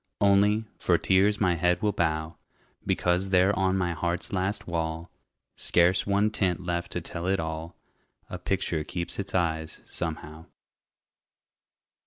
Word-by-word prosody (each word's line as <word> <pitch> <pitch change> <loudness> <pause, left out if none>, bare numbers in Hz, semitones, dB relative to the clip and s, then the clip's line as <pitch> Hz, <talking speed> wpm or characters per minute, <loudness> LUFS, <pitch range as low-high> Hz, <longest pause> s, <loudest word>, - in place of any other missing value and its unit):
Only, 100 +2 +3
for - - +3
tears 100 +2 +3
my 90 -4 +3
head 90 +1 +1
will 105 - +3
bow, 80 -2 -1 0.5
Because 90 +2 +1
there 95 +2 +4
on 95 -1 +1
my 90 -2 0
heart's 85 +2 -2
last 95 +2 -1
wall, 85 0 -3 0.4
Scarce 90 +3 +3
one 100 +2 +2
tint 95 -4 -1
left 85 0 -2
to - - -2
tell 85 +2 -4
it 95 +1 +1
all, 80 +1 -5 0.5
A 90 - -7
picture 90 -4 -1
keeps 85 +3 -4
its 100 -1 -4
eyes, 80 -3 -1
somehow. 80 -1 -5
90 Hz, 140 wpm, -27 LUFS, 85-95 Hz, 0.5 s, there